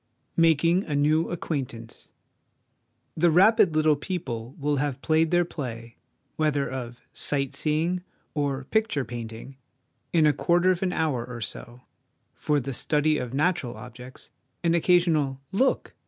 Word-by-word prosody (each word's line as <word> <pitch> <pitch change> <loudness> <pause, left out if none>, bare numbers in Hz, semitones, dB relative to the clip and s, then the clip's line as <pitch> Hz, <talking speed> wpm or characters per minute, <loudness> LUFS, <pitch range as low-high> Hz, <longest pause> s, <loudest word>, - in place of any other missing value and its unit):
Making 165 +2 +3
a 150 - -3
New 155 +3 +2
Acquaintance. 130 -9 -5 1.1
The 170 +2 +3
rapid 190 +1 +5
little 155 -1 +4
people 135 - -5
will 145 0 0
have 140 -1 -1
played 160 0 +2
their 175 +1 +3
play, 120 -8 -7 0.4
whether 150 -3 +1
of 125 -2 -6
'sight 140 -1 0
seeing' 155 +5 0 0.3
or 140 -2 -1
'picture 215 - 0
painting,' 115 +2 -8 0.5
in 160 -2 +4
a 150 - +4
quarter 175 +5 +3
of 180 - -2
an 190 -2 0
hour 150 -9 0
or 125 -1 -8
so; 120 +2 -7 0.5
for 150 -1 0
the 135 0 -5
study 150 +3 +1
of 125 - -5
natural 150 -5 0
objects, 125 +1 -11 0.3
an 170 -1 +3
occasional 165 -6 +2
' - - -44 0.2
Look - - -2
150 Hz, 140 wpm, -26 LUFS, 130-165 Hz, 1.1 s, rapid